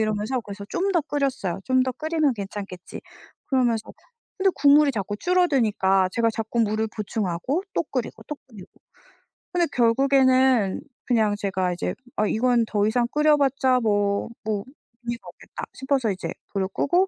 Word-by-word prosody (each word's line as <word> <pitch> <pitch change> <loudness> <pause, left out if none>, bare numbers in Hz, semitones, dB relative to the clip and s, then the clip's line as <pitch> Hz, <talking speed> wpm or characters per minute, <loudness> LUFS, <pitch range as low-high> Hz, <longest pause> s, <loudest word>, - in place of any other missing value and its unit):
이러면서 215 +4 -1
그래서 200 -2 -8
좀 390 +2 0
더 340 -3 +2
끓였어요. 270 - -2
'좀 260 0 +3
더 255 - -1
끓이면 310 +1 0
괜찮겠지.' 195 -3 -7 0.5
그러면서 240 -5 +1 0.5
근데 385 0 +3
국물이 290 0 +5
자꾸 205 -3 -3
줄어드니까 225 - +2
제가 230 -1 +2
자꾸 225 +1 -3
물을 220 0 +1
보충하고 215 - -2
또 - - +2
끓이고 255 -3 -4
또 300 - -4
끓이고. 200 -6 -12 0.9
근데 350 -2 +2
결국에는 260 -3 +3 0.3
그냥 220 -4 +2
제가 190 -3 -1
이제 175 - -3 0.2
'아 215 - +1
이건 240 +2 +2
더 210 -1 +1
이상 240 +2 +2
끓여봤자 280 -4 +3
뭐 205 -2 +1 0.2
뭐 210 -2 -1 0.4
의미가 235 0 -5
없겠다.' - - -10
싶어서 265 -5 0
이제 180 -3 -5 0.2
불을 195 -2 0
끄고 360 +6 +2
235 Hz, 335 characters per minute, -24 LUFS, 205-275 Hz, 0.9 s, 국물이